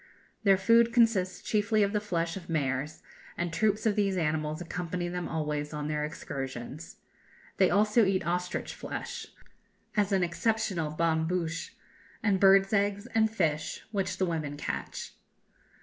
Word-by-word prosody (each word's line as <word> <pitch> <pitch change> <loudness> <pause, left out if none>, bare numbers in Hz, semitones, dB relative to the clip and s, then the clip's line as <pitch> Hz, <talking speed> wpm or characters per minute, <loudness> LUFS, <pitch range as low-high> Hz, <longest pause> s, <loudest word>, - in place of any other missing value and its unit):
Their 195 -3 +5
food 230 +4 +5
consists 225 -6 +2
chiefly 215 0 +2
of 200 +1 0
the 210 - +2
flesh 170 -5 -1
of 185 -3 -9
mares, 145 -1 -1 0.3
and 175 -1 -2
troops 210 +4 +1
of 215 -2 +3
these 195 -3 +1
animals 155 -1 -1
accompany 175 0 -3
them 180 0 -3
always 150 -2 -2
on 150 0 -3
their 150 -1 -1
excursions. 135 0 -6 0.6
They - - +5
also 210 +3 +4
eat 190 -4 +1
ostrich 180 +1 -2
flesh, - - -6 0.7
as 205 -1 +2
an 190 -2 +3
exceptional 175 -2 0
bonne 160 +1 +1
bouche, 165 -2 -2 0.5
and 200 -4 +2
birds' 195 +1 +6
eggs, 200 0 +1
and 220 -1 +4
fish, 160 -8 -1
which 195 -3 -1
the 190 - +2
women 155 -4 -3
catch. - - -5
180 Hz, 150 wpm, -29 LUFS, 160-205 Hz, 0.7 s, birds